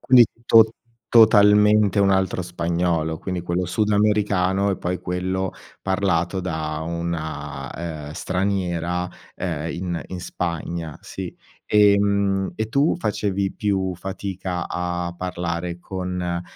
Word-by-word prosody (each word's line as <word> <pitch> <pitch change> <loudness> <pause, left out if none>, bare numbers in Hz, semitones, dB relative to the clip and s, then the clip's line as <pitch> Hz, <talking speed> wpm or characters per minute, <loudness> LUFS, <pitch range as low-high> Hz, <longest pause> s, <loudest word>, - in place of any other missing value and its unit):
Quindi 125 -3 +7 0.2
tot 110 -1 +7 0.4
totalmente 105 -2 +6
un 100 - +4
altro 95 -1 +1
spagnolo, 85 -2 -1
quindi 90 -1 -4
quello 90 +1 -1
sudamericano 100 -1 +2
e 95 - -2
poi 90 0 -2
quello 95 +1 -2 0.3
parlato 95 -1 0
da 80 -3 -3
una, 80 -5 -4 0.4
uhm, 75 - -7
straniera, 90 -2 -1 0.3
uhm, 80 -3 -3
in 85 -2 -3
in 90 -1 -6
Spagna, 85 -2 -4
sì. - - -7 0.3
Ehm, 100 -2 +3
e 110 0 -2
tu 140 +8 +2
facevi 100 - -1
più 95 -3 -1
fatica 95 -1 -4
a 90 0 -3
parlare 85 -1 -3
con, 90 0 -4
uhm, 85 -1 -2
90 Hz, 115 wpm, -23 LUFS, 85-100 Hz, 0.4 s, Quindi